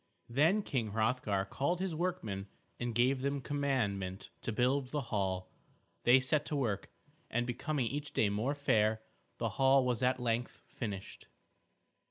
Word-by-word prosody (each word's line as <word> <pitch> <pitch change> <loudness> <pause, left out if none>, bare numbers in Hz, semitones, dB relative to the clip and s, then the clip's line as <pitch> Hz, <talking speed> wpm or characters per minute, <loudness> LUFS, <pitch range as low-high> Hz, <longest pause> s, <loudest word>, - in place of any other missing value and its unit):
Then 160 - +3
King 115 - -2
Hrothgar 110 -3 +1
called 140 - -1
his 190 -2 -1
workmen 155 - -2 0.3
and 120 -2 -2
gave 130 +2 +3
them 140 +1 0
commandment 115 -10 -1
to - - -2
build 125 +4 +1
the 140 -4 -3
hall. 95 -2 -1 0.5
They 125 +2 +8
set 140 +3 +2
to 150 - -2
work, 115 -8 -1 0.4
and 120 +1 0
becoming 135 +2 -1
each 145 +5 -3
day 110 - +3
more 110 +8 0
fair, 110 -6 +2 0.3
the 115 - -1
hall 135 +4 +4
was 125 -1 0
at 130 0 +2
length 120 0 -1
finished. 100 -5 -6
125 Hz, 150 wpm, -33 LUFS, 110-140 Hz, 0.5 s, They